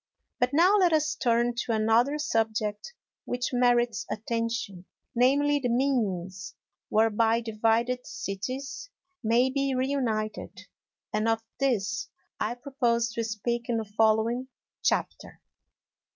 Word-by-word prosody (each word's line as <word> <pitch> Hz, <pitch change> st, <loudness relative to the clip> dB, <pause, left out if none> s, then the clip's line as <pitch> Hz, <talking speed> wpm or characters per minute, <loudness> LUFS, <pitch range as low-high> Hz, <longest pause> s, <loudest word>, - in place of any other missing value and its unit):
But 245 Hz, -, +3 dB
now 355 Hz, +8 st, +5 dB
let 360 Hz, -4 st, +4 dB
us 310 Hz, 0 st, +2 dB
turn 240 Hz, -2 st, +1 dB
to 235 Hz, -, -1 dB
another 225 Hz, +6 st, +3 dB
subject 225 Hz, -, -1 dB, 0.3 s
which 245 Hz, +1 st, -2 dB
merits 240 Hz, -5 st, +2 dB
attention, 230 Hz, -4 st, -3 dB, 0.3 s
namely, 285 Hz, +4 st, +3 dB
the 250 Hz, -3 st, -1 dB
means 195 Hz, -8 st, -1 dB, 0.3 s
whereby 225 Hz, +1 st, +3 dB
divided 230 Hz, +2 st, 0 dB
cities 255 Hz, -, -5 dB, 0.3 s
may 240 Hz, +4 st, +3 dB
be 275 Hz, -1 st, 0 dB
reunited; 250 Hz, -5 st, -2 dB, 0.5 s
and 215 Hz, +1 st, +1 dB
of 225 Hz, 0 st, +1 dB, 0.2 s
this 245 Hz, -3 st, 0 dB, 0.3 s
I 240 Hz, -, -1 dB
propose 240 Hz, -3 st, 0 dB
to 230 Hz, +1 st, -2 dB
speak 235 Hz, +2 st, -3 dB
in 235 Hz, -, +1 dB
the 220 Hz, -, -2 dB
following 220 Hz, +4 st, +1 dB, 0.3 s
Chapter. -, -, -1 dB
235 Hz, 115 wpm, -27 LUFS, 220-260 Hz, 0.5 s, now